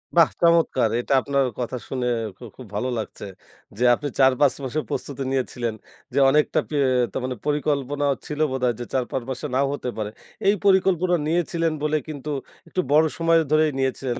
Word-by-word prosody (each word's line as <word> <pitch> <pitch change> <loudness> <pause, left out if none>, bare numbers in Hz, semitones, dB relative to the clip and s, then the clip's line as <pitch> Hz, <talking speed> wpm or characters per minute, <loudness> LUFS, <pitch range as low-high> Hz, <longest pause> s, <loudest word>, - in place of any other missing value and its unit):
বাহ 165 -3 +6
চমৎকার! 165 -9 +4
এটা 130 - -1
আপনার 140 0 +1
কথা 125 +1 -3
শুনে 125 -2 -2 0.3
খু - - -14
খুব 125 -4 -10
ভালো 125 +5 -1
লাগছে। 110 - -6 0.5
যে 125 - -1
আপনি 145 - -5
৪-৫ 135 +1 +5
মাসের 145 +4 -2
প্রস্তুতি 140 -1 -4
নিয়েছিলেন 120 -3 -1 0.4
যে - - +2
অনেকটাি 150 +1 +1 0.4
তা - - -2
মানে 130 0 -2
পরিকল্পনা 145 -1 0 0.2
ছিল 150 0 -5
বোধহয় 125 -2 +1
যে 120 - -4
৪-৫ 130 0 -1
মাসে 130 +3 -4
নাও 135 +1 +2
হতে 125 - -4
পারে। 105 -1 -2 0.4
এই 205 - +5
পরিকল্পনা 185 -2 +3
নিয়েছিলেন 165 -1 0
বলে 150 0 +2
কিন্তু 150 -1 -6 0.4
একটু 185 - -1
বড় 155 +2 +6
সময় 165 0 +4
ধরেই 155 0 +4
নিয়েছিলেন। 130 -2 -1
140 Hz, 165 wpm, -23 LUFS, 130-155 Hz, 0.5 s, বাহ